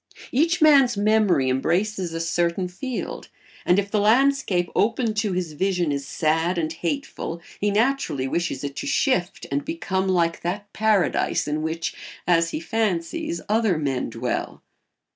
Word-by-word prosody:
Each 330 Hz, +5 st, +2 dB
man's 275 Hz, -7 st, +6 dB
memory 205 Hz, -9 st, +3 dB
embraces 175 Hz, +8 st, 0 dB
a 165 Hz, -, -4 dB
certain 170 Hz, +2 st, 0 dB
field, 245 Hz, +8 st, -5 dB, 0.4 s
and 180 Hz, -, +5 dB
if 200 Hz, 0 st, 0 dB
the 215 Hz, -, +2 dB
landscape 220 Hz, -5 st, +2 dB
open 230 Hz, +1 st, +1 dB
to 210 Hz, -2 st, -1 dB
his 180 Hz, -3 st, -2 dB
vision 180 Hz, -1 st, 0 dB
is 140 Hz, -1 st, -3 dB
sad 160 Hz, +3 st, 0 dB
and 160 Hz, -1 st, -1 dB
hateful 170 Hz, -, -4 dB, 0.2 s
he 205 Hz, -, +1 dB
naturally 215 Hz, -, +1 dB
wishes 160 Hz, -2 st, -2 dB
it 140 Hz, -1 st, -4 dB
to 285 Hz, -, -4 dB
shift 230 Hz, -10 st, 0 dB
and 140 Hz, +1 st, 0 dB
become 190 Hz, +3 st, -2 dB
like 170 Hz, -3 st, +1 dB
that 200 Hz, +4 st, -4 dB
paradise 215 Hz, -4 st, +1 dB
in 150 Hz, +1 st, -1 dB
which, 160 Hz, +1 st, -2 dB, 0.3 s
as 165 Hz, -1 st, +3 dB
he -, -, -3 dB
fancies, 170 Hz, -4 st, -2 dB
other 215 Hz, -4 st, +2 dB
men 135 Hz, -4 st, -1 dB
dwell. -, -, -4 dB
180 Hz, 150 wpm, -24 LUFS, 165-215 Hz, 0.4 s, man's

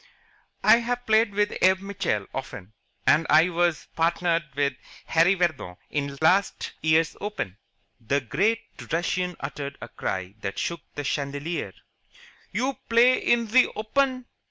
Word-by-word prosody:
"I've 245 Hz, +1 st, +3 dB
played 220 Hz, -1 st, +3 dB
with 210 Hz, 0 st, +1 dB
Abe 190 Hz, 0 st, +4 dB
Mitchell 185 Hz, -, -2 dB
often, 110 Hz, -6 st, -7 dB, 0.3 s
and 160 Hz, +1 st, +4 dB
I 160 Hz, +4 st, +6 dB
was 175 Hz, -2 st, 0 dB
partnered 170 Hz, 0 st, +1 dB
with 140 Hz, -1 st, +1 dB, 0.3 s
Harry 170 Hz, +4 st, +4 dB
Vardon 160 Hz, -, -1 dB
in 140 Hz, -1 st, -2 dB
last 185 Hz, +5 st, +2 dB
year's 160 Hz, 0 st, +2 dB
Open." 155 Hz, -, -4 dB, 0.4 s
The 140 Hz, +5 st, +1 dB
great 210 Hz, -, 0 dB, 0.3 s
Russian 180 Hz, +2 st, -1 dB
uttered 140 Hz, 0 st, -5 dB
a 115 Hz, -, -8 dB
cry 95 Hz, 0 st, -4 dB
that 100 Hz, -1 st, -4 dB
shook 170 Hz, -2 st, -3 dB
the 145 Hz, -, -4 dB
chandelier. 145 Hz, +4 st, -3 dB, 0.8 s
"You 265 Hz, +2 st, -1 dB
play 240 Hz, +2 st, +5 dB
in 235 Hz, -1 st, +2 dB
ze 250 Hz, +4 st, +5 dB
Open? 255 Hz, +3 st, 0 dB
170 Hz, 130 wpm, -25 LUFS, 140-210 Hz, 0.8 s, I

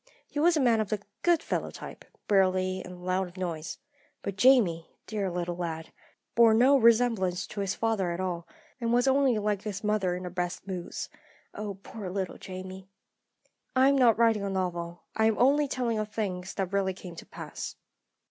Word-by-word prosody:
He 290 Hz, -, -4 dB
was 335 Hz, +2 st, +4 dB
a -, -, +3 dB
man 240 Hz, -5 st, +4 dB
of 215 Hz, -2 st, -1 dB
the 215 Hz, -, -1 dB, 0.2 s
'good 345 Hz, -2 st, +3 dB
fellow' -, -, -2 dB
type -, -, -10 dB, 0.2 s
burly, 185 Hz, -1 st, +2 dB
and 180 Hz, 0 st, -10 dB
loud 185 Hz, +1 st, 0 dB
of 175 Hz, -, -15 dB
voice. 170 Hz, -4 st, -4 dB, 0.5 s
But 200 Hz, -, -3 dB
Jamie, 200 Hz, -9 st, +4 dB, 0.2 s
dear 205 Hz, -3 st, -2 dB
little 175 Hz, 0 st, -3 dB
lad, 165 Hz, -2 st, -4 dB, 0.4 s
bore 230 Hz, -1 st, +6 dB
no 255 Hz, +5 st, +6 dB
resemblance 225 Hz, -7 st, +3 dB
to 210 Hz, -, -8 dB
his 195 Hz, -1 st, -1 dB
father 220 Hz, -5 st, 0 dB
at 170 Hz, +1 st, -3 dB
all, 175 Hz, -2 st, -3 dB, 0.3 s
and 230 Hz, -2 st, -1 dB
was 245 Hz, +2 st, +3 dB
only 265 Hz, -3 st, +4 dB
like 210 Hz, -1 st, 0 dB
his 205 Hz, -1 st, -5 dB
mother 210 Hz, -4 st, +1 dB
in 180 Hz, -, -6 dB
her 180 Hz, -, -5 dB
best 180 Hz, 0 st, -3 dB
moods. 185 Hz, -3 st, -5 dB, 0.5 s
Oh, 205 Hz, -2 st, -5 dB
poor 210 Hz, -5 st, -7 dB
little 190 Hz, -1 st, -3 dB
Jamie! 185 Hz, 0 st, -8 dB, 0.9 s
"I 260 Hz, +1 st, +6 dB
am 280 Hz, -, +4 dB
not 245 Hz, -5 st, +5 dB
writing 225 Hz, -2 st, +4 dB
a 200 Hz, -, -1 dB
novel; 175 Hz, -2 st, -3 dB
I 220 Hz, -, +3 dB
am 220 Hz, -1 st, +3 dB
only 285 Hz, +4 st, +4 dB
telling 240 Hz, -4 st, -1 dB
of 215 Hz, 0 st, -2 dB
things 190 Hz, -4 st, -3 dB
that 195 Hz, -1 st, -2 dB
really 190 Hz, -1 st, +1 dB
came 180 Hz, -2 st, -9 dB
to -, -, -9 dB
pass. -, -, -7 dB
195 Hz, 190 wpm, -28 LUFS, 180-230 Hz, 0.9 s, bore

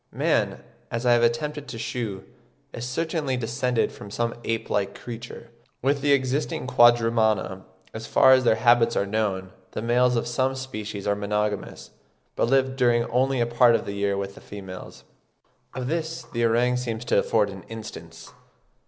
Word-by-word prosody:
Man, -, -, 0 dB, 0.3 s
as 115 Hz, +2 st, -3 dB
I 120 Hz, -, +5 dB
have 120 Hz, -, +4 dB
attempted 145 Hz, +5 st, 0 dB
to 115 Hz, -, -7 dB
shew, 115 Hz, -4 st, -4 dB, 0.5 s
is 120 Hz, +1 st, -5 dB
certainly 155 Hz, -2 st, -1 dB
descended 125 Hz, 0 st, 0 dB
from 105 Hz, -, -11 dB
some 115 Hz, +3 st, -1 dB
ape 115 Hz, 0 st, -2 dB
like 100 Hz, -1 st, -2 dB
creature. 120 Hz, 0 st, -9 dB, 0.3 s
With 140 Hz, +1 st, +1 dB
the 145 Hz, -, +2 dB
existing 135 Hz, +1 st, 0 dB
Quadrumana, 115 Hz, -6 st, +3 dB, 0.3 s
as 110 Hz, +1 st, -7 dB
far 130 Hz, -, +6 dB
as 130 Hz, 0 st, +4 dB
their 115 Hz, -, +4 dB
habits 120 Hz, +1 st, +4 dB
are -, -, +1 dB
known, 100 Hz, -3 st, -2 dB, 0.2 s
the -, -, -3 dB
males 125 Hz, +1 st, +3 dB
of 115 Hz, -, 0 dB
some 130 Hz, +2 st, 0 dB
species 110 Hz, -6 st, -6 dB
are 100 Hz, 0 st, +1 dB
monogamous, 105 Hz, 0 st, -3 dB, 0.4 s
but -, -, +1 dB
live 135 Hz, 0 st, +2 dB
during 120 Hz, -2 st, +3 dB
only 130 Hz, +2 st, +2 dB
a -, -, +3 dB
part 120 Hz, 0 st, +4 dB
of 115 Hz, -, -1 dB
the 100 Hz, -, -4 dB
year 100 Hz, 0 st, 0 dB
with 100 Hz, 0 st, -4 dB
the -, -, -14 dB
females: 95 Hz, -2 st, -10 dB, 0.7 s
of 130 Hz, -, -3 dB
this 165 Hz, +3 st, -3 dB
the 115 Hz, 0 st, -1 dB
orang 120 Hz, +2 st, +2 dB
seems 120 Hz, -2 st, -4 dB
to -, -, +3 dB
afford 105 Hz, -3 st, +1 dB
an 95 Hz, -1 st, -9 dB
instance. 85 Hz, -8 st, -9 dB
120 Hz, 170 wpm, -25 LUFS, 105-125 Hz, 0.7 s, far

